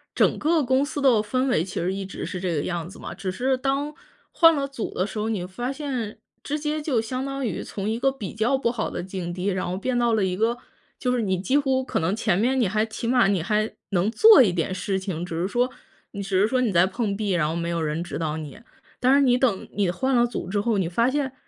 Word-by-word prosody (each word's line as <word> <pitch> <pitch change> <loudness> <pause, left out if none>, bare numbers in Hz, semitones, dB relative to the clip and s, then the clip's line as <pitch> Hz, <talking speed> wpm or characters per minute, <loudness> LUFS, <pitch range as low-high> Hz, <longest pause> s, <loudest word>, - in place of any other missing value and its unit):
整 - - +3
个 315 0 +2
公 260 +2 +2
司 290 0 -4
的 275 - +6
氛 255 +5 -1
围 245 - +2
其 185 +2 -4
实 180 +2 -1
一 195 0 -4
直 195 - -6
是 185 - -5
这 175 -2 -1
个 145 - -1
样 175 -2 -3
子 195 - -12
嘛， - - -7
只 195 - -5
是 255 +8 0
当 275 +3 -1 0.4
换 330 -1 +6
了 280 -1 -1
组 275 -5 -5
的 185 - 0
时 215 - -5
候， 215 - -1
你 220 -4 -1
会 - - -6
发 245 +7 -3
现 260 -7 -4 0.2
直 295 - -3
接 305 0 -2
就 275 -7 +1
相 255 +4 -4
当 275 -1 -3
于 205 -7 -3
从 200 +1 -4
一 225 +2 -1
个 270 - +3
比 215 -9 -6
较 225 +5 +1
不 235 -3 0
好 230 -3 -2
的 - - -5
境 180 -2 -5
地， 180 +2 -3
然 185 -2 -1
后 180 - -2
变 245 +4 -1
到 235 -1 +2
了 215 -2 +2
一 185 -1 -1
个， 230 +2 +1 0.4
就 250 - -1
是 250 -1 +1
你 190 -4 0
几 200 +10 +1
乎 265 -2 +1
可 - - -2
能 165 +5 0
前 215 -5 +1
面 255 +5 +2
你 - - +3
还 215 +3 +1
起 225 +1 -5
码 245 -3 +4
你 195 -5 +1
还 215 +3 0 0.2
能 190 +1 +1
做 435 - +8
一 205 -8 +3
点 175 +2 -1
事 190 +1 -2
情， 185 -3 -4
只 170 - -6
是 185 - -1
说 245 +2 +1 0.4
你 200 - -5
只 190 -1 0
是 205 - +4
说 255 +2 +1
你 240 -4 +1
在 170 0 +5
碰 200 +1 -2
壁， 210 -2 -1
然 165 -4 +1
后 - - -2
没 170 0 -2
有 170 -1 -1
人 155 +1 -1
指 175 - -5
导 160 -1 -2
你。 155 +5 -7 0.4
但 255 +1 +4
是 280 - +6
你 250 -3 +4
等 240 -7 0
你 195 -4 +1
换 260 +8 0
了 240 0 +5
组 235 -7 -5
之 200 +2 0
后， 225 0 +1
你 185 -4 0
发 235 +9 +1
现 275 -2 -1
220 Hz, 295 characters per minute, -24 LUFS, 185-260 Hz, 0.4 s, 做